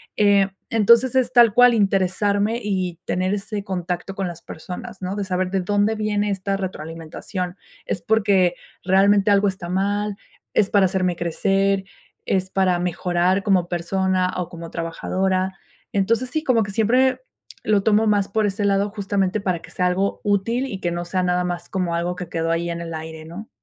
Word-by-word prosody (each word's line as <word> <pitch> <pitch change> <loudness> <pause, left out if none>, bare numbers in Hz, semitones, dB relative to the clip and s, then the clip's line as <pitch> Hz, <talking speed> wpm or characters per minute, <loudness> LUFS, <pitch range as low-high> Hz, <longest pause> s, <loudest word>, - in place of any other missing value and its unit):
Eh, 200 -2 +4 0.2
entonces, 235 +3 +5
es 260 -2 +2
tal 235 -4 +6
cual 245 +1 +6
interesarme, 200 +2 +1
y 185 -4 -2
tener 185 +2 0
ese 205 0 -5
contacto 180 0 -4
con 195 -1 -2
las 170 -1 -8
personas, 190 +6 -8
¿no? 185 +2 -3
De 205 - -2
saber 185 -1 -1
de 195 - +1
dónde 205 +3 +1
viene 210 -1 0
esta 195 0 -2
retroalimentación, 180 +1 -5 0.3
es 180 - -3
porque 200 -5 +2 0.3
realmente 195 +2 +4
algo 200 0 +4
está 185 -2 -7
mal, 200 +2 -1 0.4
es 205 -2 +3
para 200 -2 +5
hacerme 185 -1 0
crecer, 195 +3 +1 0.4
es 190 -1 0
para 185 -2 +1
mejorar 180 +2 0
como 185 -4 +2
persona, 185 +1 0
o 180 -1 -3
como 170 -1 -9
trabajadora. 185 +3 -1 0.4
Entonces, 230 +5 +1
sí, 315 +2 -2
como 240 -5 +3
que 200 - -6
siempre 250 - +2 0.4
lo 205 -2 +2
tomo 220 +1 +3
más 205 -2 +2
por 215 +1 0
ese 205 +1 -2
lado, 200 0 +2
justamente 200 -1 -1
para 185 -3 -1
que - - -14
sea 180 - -1
algo 190 +2 0
útil, 215 +5 0
y 200 -8 -5
que 175 - 0
no 175 0 -3
sea 185 +1 -1
nada 180 0 +1
más 175 -1 -4
como 180 -3 -1
algo 175 +1 -1
que 180 -1 -6
quedó 165 -1 -2
ahí 170 +1 -1
en 170 0 -4
el 165 -1 -6
aire, 160 0 -7
¿no? 180 +7 -9
195 Hz, 180 wpm, -22 LUFS, 180-205 Hz, 0.4 s, tal